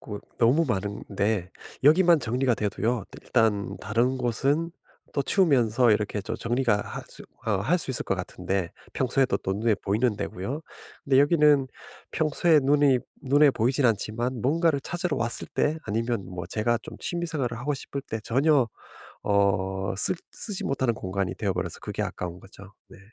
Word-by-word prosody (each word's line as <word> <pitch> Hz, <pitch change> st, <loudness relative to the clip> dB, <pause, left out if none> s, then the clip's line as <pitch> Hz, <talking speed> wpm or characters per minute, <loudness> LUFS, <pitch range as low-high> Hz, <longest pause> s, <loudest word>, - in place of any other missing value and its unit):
곳 105 Hz, -2 st, -7 dB, 0.2 s
너무 130 Hz, +8 st, +4 dB
많은데 100 Hz, -1 st, -2 dB, 0.3 s
여기만 170 Hz, +2 st, +6 dB
정리가 125 Hz, +2 st, +1 dB
돼도요. 110 Hz, +2 st, -1 dB, 0.2 s
일단 110 Hz, -4 st, +1 dB
다른 120 Hz, +4 st, 0 dB
곳은 135 Hz, +7 st, 0 dB, 0.4 s
또 140 Hz, -, +1 dB
치우면서 130 Hz, -, +3 dB
이렇게 105 Hz, 0 st, -1 dB
또 -, -, -4 dB
정리가 120 Hz, -1 st, +1 dB
할 -, -, -7 dB
수 -, -, -10 dB, 0.2 s
어 105 Hz, -3 st, +2 dB
할 175 Hz, -, +2 dB
수 150 Hz, -, +2 dB
있을 130 Hz, -, -1 dB
것 -, -, 0 dB
같은데 90 Hz, -1 st, -3 dB, 0.2 s
평소에도 130 Hz, +1 st, +1 dB
또 95 Hz, -, -2 dB
눈에 110 Hz, +2 st, +2 dB
보이는 105 Hz, +4 st, 0 dB
데고요. 110 Hz, -, -4 dB, 0.4 s
근데 135 Hz, -1 st, +3 dB
여기는 145 Hz, -3 st, +4 dB, 0.4 s
평소에 155 Hz, 0 st, +3 dB
눈이 140 Hz, -1 st, +4 dB, 0.2 s
눈에 145 Hz, +2 st, +5 dB
보이지는 130 Hz, +2 st, +2 dB
않지만 115 Hz, +3 st, -3 dB
뭔가를 155 Hz, +1 st, +2 dB
찾으러 175 Hz, 0 st, -2 dB
왔을 115 Hz, 0 st, -2 dB
때 155 Hz, +2 st, +1 dB
아니면 115 Hz, -1 st, -1 dB
뭐 90 Hz, -1 st, -6 dB
제가 110 Hz, +5 st, 0 dB
좀 -, -, -9 dB
취미 175 Hz, -2 st, -3 dB
생활을 130 Hz, -8 st, -2 dB
하고 145 Hz, +5 st, -1 dB
싶을 140 Hz, 0 st, -6 dB
때 110 Hz, -5 st, -5 dB
전혀 135 Hz, 0 st, +3 dB, 0.6 s
어 95 Hz, -1 st, +1 dB
쓰 105 Hz, -, +2 dB, 0.2 s
쓰지 205 Hz, -4 st, -4 dB
못하는 130 Hz, -3 st, +1 dB
공간이 95 Hz, -2 st, -3 dB
되어 -, -, -1 dB
버려서 -, -, -3 dB
그게 -, -, -4 dB
아까운 90 Hz, 0 st, -5 dB
거죠. 100 Hz, +1 st, -14 dB, 0.2 s
네. -, -, -14 dB
120 Hz, 330 characters per minute, -26 LUFS, 105-140 Hz, 0.6 s, 여기만